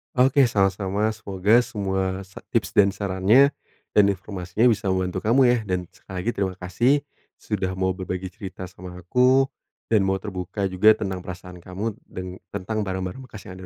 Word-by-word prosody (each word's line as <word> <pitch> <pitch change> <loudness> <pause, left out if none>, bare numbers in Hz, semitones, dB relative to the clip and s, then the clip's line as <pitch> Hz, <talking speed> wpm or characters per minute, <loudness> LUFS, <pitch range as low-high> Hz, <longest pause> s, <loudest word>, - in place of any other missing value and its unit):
Oke, 130 +1 +5
sama-sama. 100 0 +1
Semoga 105 +1 +2
semua 95 -5 -2
sa 95 - -12
tips - - 0
dan 100 -1 +5
sarannya, 100 +8 +4 0.4
dan 105 -1 +5
informasinya 95 0 -2
bisa 105 -2 -1
membantu 95 -1 0
kamu, 120 +5 +3
ya. 125 -1 +5
Dan, 90 -2 -2
sekali 95 - -12
lagi, 120 - +1
terima 95 -4 -2
kasih 95 +8 +1 0.4
sudah 95 -3 -3
mau 95 0 +1
berbagi 95 0 -5
cerita 95 0 -8
sama 90 0 -9
aku, 125 +9 +3 0.5
dan 105 -4 +4
mau 95 - +2
terbuka 95 0 -4
juga 105 +4 +6
tentang 95 -3 -3
perasaan 90 -1 -9
kamu 100 +5 -5
deng 90 0 -7
tentang 100 +2 -4
barang-barang 95 +7 -4
bekas 110 -5 -11
yang 95 0 -10
ada - - -10
95 Hz, 165 wpm, -24 LUFS, 95-110 Hz, 0.5 s, juga